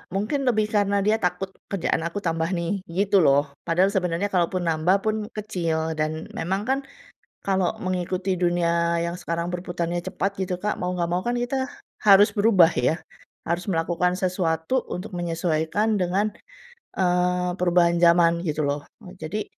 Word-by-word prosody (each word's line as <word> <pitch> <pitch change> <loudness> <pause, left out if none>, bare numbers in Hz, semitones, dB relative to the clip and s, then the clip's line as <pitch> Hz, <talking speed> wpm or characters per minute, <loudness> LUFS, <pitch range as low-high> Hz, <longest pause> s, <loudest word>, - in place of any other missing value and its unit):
mungkin 215 +9 0
lebih 215 -3 +3
karena 205 -1 +2
dia 215 +1 +3
takut, 180 +2 -1 0.2
"kerjaan 190 -4 -1
aku 170 +4 -4
tambah 165 -1 0
nih," 170 +4 -2 0.2
gitu 200 0 +3
loh. 140 -4 +4 0.2
Padahal 180 +4 +3
sebenarnya 185 0 -1
kalaupun 180 0 0
nambah 170 +4 +2
pun 215 0 +1 0.2
kecil. 165 -7 -2
Dan 155 +1 -3
memang 190 +5 -2
kan 265 +4 0 0.7
kalau 190 -2 +1
mengikuti 185 +1 -2
dunia 170 -1 +1
yang 170 +1 -2
sekarang 170 -1 -3
berputarnya 175 -1 -3
cepat 195 +1 -2
gitu, 180 -1 -2
Kak, 210 +3 -1
mau 180 - -1
nggak 170 - +1
mau 180 +1 0
kan 240 +2 -1
kita 260 +2 -2 0.3
harus 205 0 +6
berubah 200 -5 +5
ya. 125 +7 +1 0.5
Harus 170 +4 -2
melakukan 175 +1 0
sesuatu 180 +4 0
untuk 185 +3 -5
menyesuaikan 170 +4 0
dengan, 200 +2 0 0.6
eee, 180 -1 +1
perubahan 175 -1 +3
zaman, 170 0 +5
gitu 155 -3 -1
loh. 145 +1 -1 0.4
Jadi 180 +7 -3
180 Hz, 150 wpm, -24 LUFS, 170-200 Hz, 0.7 s, harus